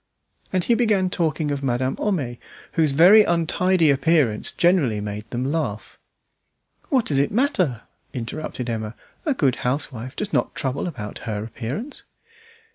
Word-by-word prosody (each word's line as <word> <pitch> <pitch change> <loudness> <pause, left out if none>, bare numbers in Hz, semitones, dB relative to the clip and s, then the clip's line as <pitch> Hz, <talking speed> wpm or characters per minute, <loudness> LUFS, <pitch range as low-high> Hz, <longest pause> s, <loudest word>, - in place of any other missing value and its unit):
And 185 -1 +1
he 235 - +2
began 210 -6 +2
talking 155 -3 0
of 140 -1 -2
Madame 130 0 0
Homais, 140 - -2 0.3
whose 160 -4 +2
very 180 +9 +7
untidy 170 -1 +2
appearance 140 -5 +2
generally 165 - +2
made 105 +1 -6
them 130 +3 -2
laugh. 130 -10 -3 0.9
"What 260 -6 +2
does 140 -2 +1
it 140 - +2
matter?" 185 - +1 0.3
interrupted 125 +1 -5
Emma. 110 -1 -3 0.3
"A 290 - +2
good 135 - +1
housewife 130 -1 -3
does 210 -1 -4
not - - 0
trouble 140 +4 -2
about 105 - -6
her 105 -1 -2
appearance." 125 - -6
140 Hz, 140 wpm, -23 LUFS, 120-180 Hz, 0.9 s, very